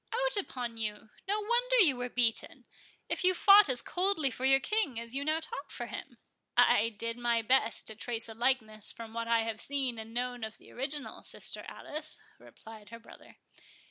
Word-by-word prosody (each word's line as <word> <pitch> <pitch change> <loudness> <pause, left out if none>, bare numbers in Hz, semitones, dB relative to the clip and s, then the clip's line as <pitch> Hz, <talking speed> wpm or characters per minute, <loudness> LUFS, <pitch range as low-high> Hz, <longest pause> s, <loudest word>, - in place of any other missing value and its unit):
—Out - - +1
upon 250 - -3
you!—no 220 - -4
wonder 480 +3 +1
you 335 - +6
were 245 0 -4
beaten, 240 -2 0 0.4
if - - -2
you 370 0 +4
fought 400 -3 +7
as 250 -2 +2
coldly 360 -7 0
for 255 +2 -4
your 270 0 +5
King 295 - -1
as 230 +1 -6
you 275 +1 -1
now 310 +2 +1
talk 395 +9 -6
for - - -5
him." - - -8 0.4
"I 220 +2 +5
did 230 +2 -4
my 235 -1 +1
best 255 0 +2
to 220 - 0
trace 230 +1 -4
a 225 - -8
likeness 220 -3 0
from 225 -1 -10
what 230 0 -3
I 230 -1 +3
have 225 -1 -4
seen 265 -5 -1
and 220 0 -7
known 245 0 -3
of 220 0 -5
the - - -17
original, 275 +3 -2
sister - - -1
Alice," 305 +1 -6 0.2
replied 220 -2 -14
her 230 - -9
brother. 230 - -16
245 Hz, 190 wpm, -31 LUFS, 230-310 Hz, 0.4 s, fought